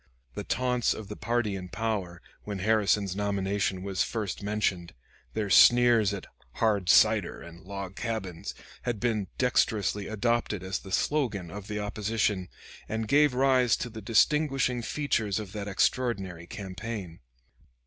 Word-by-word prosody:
The - - -5
taunts 125 -1 0
of 105 -2 -8
the 105 - -5
party 110 0 -1
in 90 -1 -7
power, 100 -7 -3 0.2
when 105 -1 -4
Harrison's 100 -1 +2
nomination 100 -1 -1
was 95 -1 -2
first 105 -5 -2
mentioned, 100 -5 -1 0.4
their 105 -3 -1
sneers 120 -2 +6
at 100 -2 -5 0.3
"hard 105 -5 +1
cider" 105 -2 +4
and 85 +1 -12
"log 100 0 -7
cabins," 110 -8 -4 0.3
had 120 -4 -2
been 110 -4 0
dexterously 105 -5 +1
adopted 110 -3 0
as 95 +1 -2
the 95 - -11
slogan 110 - 0
of 105 0 -8
the 105 0 -4
opposition, 105 -2 -1 0.4
and 110 0 -2
gave 145 +1 +4
rise 130 -2 +3
to 120 - -5
the 110 0 -8
distinguishing 130 +3 +2
features 115 -6 -1
of 105 -3 -5
that 105 -1 -5
extraordinary 95 -5 0
campaign. 95 -2 -6
105 Hz, 140 wpm, -28 LUFS, 95-115 Hz, 0.4 s, sneers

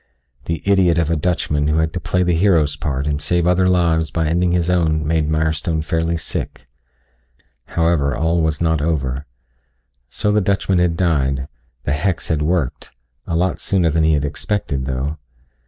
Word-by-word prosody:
The 85 -2 -3
idiot 95 -4 +3
of 85 -1 +1
a - - +2
Dutchman 75 -3 0
who 75 +1 +1
had 80 0 0
to - - -2
play 90 +1 0
the 90 -1 +1
hero's 80 -5 +3
part 70 -2 -3
and 75 0 -1
save 85 +2 +1
other 90 +1 +3
lives 85 -3 +2
by 80 -1 -1
ending 85 +2 +1
his 85 -1 +1
own 80 -4 +1
made 80 -1 0
Mirestone 80 0 0
fairly 80 0 -1
sick. 80 - -5 1.0
However, 80 -4 +1
all 80 +2 +1
was 80 -1 0
not 80 -2 +1
over. 70 -3 -2 0.8
So 105 +11 -1
the 105 0 +3
Dutchman 95 -1 +1
had 85 -2 +1
died; 70 -6 0 0.4
the 65 - -1
hex 90 +5 -1
had 80 -3 0
worked 80 -4 -1 0.4
a 85 - -1
lot 90 +2 0
sooner 90 -5 +1
than 80 +1 +1
he 80 0 +3
had 75 -1 +1
expected 75 -3 -2
though. 70 +4 -3
80 Hz, 175 wpm, -19 LUFS, 75-90 Hz, 1.0 s, idiot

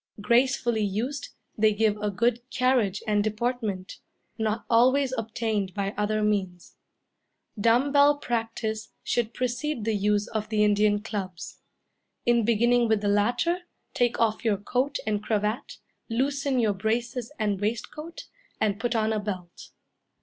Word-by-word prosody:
Gracefully 235 +1 +2
used, 245 +8 -2 0.3
they 215 0 +3
give 215 -1 +2
a 210 0 -1
good 235 +4 +1
carriage 245 -7 +1
and 210 -1 +2
deportment, 215 -3 -2 0.4
not 220 0 -2
always 260 +3 +4
obtained 220 -4 -2
by 200 0 -2
other 215 +1 0
means. 190 -4 -2 0.8
Dumb 235 +6 +3
bell 285 +1 +5
practice 225 -4 -3
should 235 -2 0
precede 250 0 -2
the 225 - +1
use 205 0 +1
of 215 -1 -3
the 215 -1 +2
Indian 205 0 +3
clubs. 190 -5 -6 0.7
In 235 -1 +3
beginning 235 +2 +3
with 220 -2 +2
the 205 - -1
latter, 245 - +2 0.3
take 240 -1 +1
off 225 0 +1
your 215 -3 +2
coat 255 +8 -1
and 210 -1 0
cravat, 210 +2 -2 0.3
loosen 270 +2 0
your 220 -3 +2
braces 230 +4 -2
and 205 -4 -1
waistcoat, 270 +10 -4 0.3
and 205 -1 0
put 240 +1 -1
on 220 0 +1
a 215 - 0
belt. 185 -4 -6
220 Hz, 140 wpm, -26 LUFS, 210-245 Hz, 0.8 s, bell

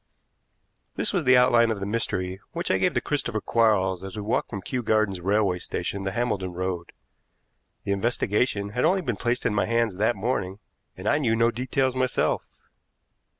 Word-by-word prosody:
This - - +1
was 175 -6 0
the 125 0 +6
outline 120 -2 +5
of 110 -3 -1
the 95 - -3
mystery 95 -3 -2
which - - -2
I - - +2
gave - - +1
to - - +2
Christopher - - -1
Quarles 95 -5 +2
as 95 -1 -7
we 105 - -4
walked 105 - -1
from 100 -4 -6
Kew 125 +4 -2
Gardens 110 -5 +1
Railway 100 -1 +1
Station 95 +3 -4
to 95 - -1
Hambledon 95 -6 -2
Road. 90 -1 -3 0.9
The - - -2
investigation 105 0 0
had 125 +5 -2
only 190 +1 +3
been 120 - -2
placed 120 +4 -1
in - - +2
my 105 - +1
hands 115 -4 +1
that 110 +4 +2
morning, 100 -3 -2 0.4
and 95 +3 -6
I 145 - +3
knew 115 -6 +1
no 115 +1 +3
details 130 +2 -1
myself. 130 -1 0
110 Hz, 185 wpm, -25 LUFS, 95-120 Hz, 0.9 s, the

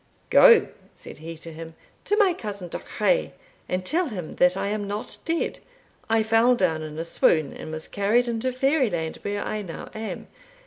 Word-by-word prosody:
'Go,' 470 -3 +8 0.3
said - - -11
he 165 +1 -8
to 165 0 -9
him, 165 0 -9 0.3
'to 415 - +1
my 400 -4 +4
cousin 200 - -6
Duchray, - - 0 0.4
and 185 0 -2
tell 335 - +1
him 180 -8 -6
that 180 +1 +4
I 200 - -1
am 205 -1 -2
not 205 +2 -3
dead. 330 0 -1 0.5
I 225 0 +3
fell 225 +3 +4
down 170 -7 +1
in 155 0 -7
a 165 - -2
swoon, 155 -3 +2
and - - -8
was 160 0 -5
carried 220 +5 +1
into 235 +2 -1
Fairyland, 255 - 0
where 205 0 -3
I 215 - -3
now 180 -5 -8
am. 220 0 -5
205 Hz, 180 wpm, -25 LUFS, 165-245 Hz, 0.5 s, Go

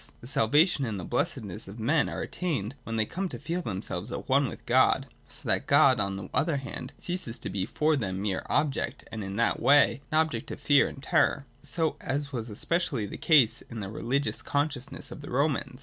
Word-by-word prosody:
The - - -13
salvation 140 - +3
and 110 -6 -2
the - - -6
blessedness 120 - -2
of 100 +3 -9
men 140 +7 +2
are - - -4
attained 135 - -3
when 115 - -3
they 110 -1 +2
come 185 - -3
to - - -6
feel 175 +2 -3
themselves 100 - -4
at - - -5
one - - +3
with - - -10
God, - - +4 0.2
so - - -9
that - - +2
God, 130 -4 +5
on 100 -1 -1
the 95 - -6
other 155 -2 +2
hand, 135 0 -6
ceases 175 -10 -3
to 100 - -5
be 95 0 -2
for 155 +5 +2
them 95 -8 -2
mere 100 -1 -1
object, 145 -2 -1
and, 110 -2 -4
in 95 0 -5
that 115 - +1
way, 145 -1 +5
an 155 - +2
object 160 0 0
of - - -6
fear 145 -1 +4
and 135 - -9
terror, 140 0 +2 0.5
as 140 +1 -3
was 115 -2 -4
especially 130 - 0
the - - -7
case 140 -9 +4
with 115 - -6
the 100 -2 -5
religious 135 +6 -1
consciousness 140 -2 -2
of - - -8
the 145 - -9
Romans. 135 -1 0
135 Hz, 210 wpm, -28 LUFS, 110-150 Hz, 0.5 s, God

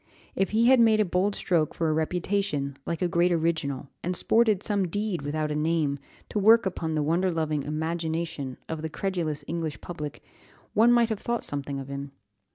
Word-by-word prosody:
If 195 - +1
he 225 +2 +3
had 260 +1 +6
made 220 -2 +5
a 215 - +4
bold 190 +3 +1
stroke 165 -4 0
for 165 - 0
a 155 - +2
reputation, 160 -3 -1
like 170 +1 -2
a - - +3
great 175 +1 +2
original, 155 -5 -1
and 180 +1 -2
sported 220 0 +3
some 200 -3 0
deed 205 -1 -2
without 150 +1 -2
a - - -1
name, 150 -2 0 0.3
to 210 - -1
work 225 +2 +6
upon 165 -4 -2
the 150 - +1
wonder 175 +5 +1
loving 155 -3 -1
imagination 160 -2 -3
of 160 -1 -4
the 160 - -3
credulous 160 -5 -2
English 160 -2 -3
public, 150 -4 -7 0.5
one 230 +3 +5
might 235 -1 +4
have 220 -3 -2
thought 235 +1 -2
something 140 -1 -4
of 135 -1 -6
him. 140 0 -6
165 Hz, 190 wpm, -27 LUFS, 150-195 Hz, 0.5 s, had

